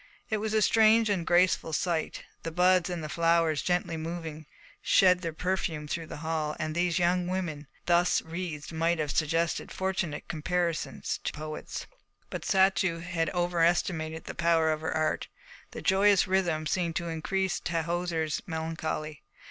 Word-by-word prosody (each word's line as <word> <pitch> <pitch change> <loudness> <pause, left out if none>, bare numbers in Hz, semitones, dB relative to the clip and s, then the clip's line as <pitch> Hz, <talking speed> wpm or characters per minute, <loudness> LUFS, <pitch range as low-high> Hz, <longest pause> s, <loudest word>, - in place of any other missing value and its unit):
It 215 - +2
was 215 +1 -2
a 215 - +4
strange 220 +1 +5
and 175 -4 -1
graceful 175 -2 +3
sight. 170 -1 -1 0.2
The 165 - -4
buds 180 +2 +3
and 175 -3 -4
the - - -3
flowers, 165 -1 +2
gently 175 -2 0
moving, 160 -2 -6 0.3
shed 180 -1 +5
their 165 -2 -2
perfume 160 -3 -2
through 165 +2 -3
the - - -7
hall, 155 -2 -1
and 155 0 -2
these 175 +1 +1
young 180 0 +2
women, 170 -6 -3 0.2
thus 175 0 +3
wreathed, 165 -2 -5
might 165 +1 +1
have 150 -2 -1
suggested 165 +2 0
fortunate 190 -5 -2
comparisons 170 +1 -2
to - - -1
poets. 155 +1 -6 0.5
But - - -4
Satou 190 -3 +2
had 165 -2 -1
overestimated 170 -2 0
the - - -7
power 165 -2 +2
of 155 0 -2
her 160 - -2
art. 155 -1 0 0.4
The - - -8
joyous 195 0 +4
rhythm 175 -5 +1
seemed 170 0 -1
to 170 -2 -2
increase 185 +3 -1
Tahoser's 170 -1 -1
melancholy. 160 -2 -4
170 Hz, 155 wpm, -29 LUFS, 160-180 Hz, 0.5 s, strange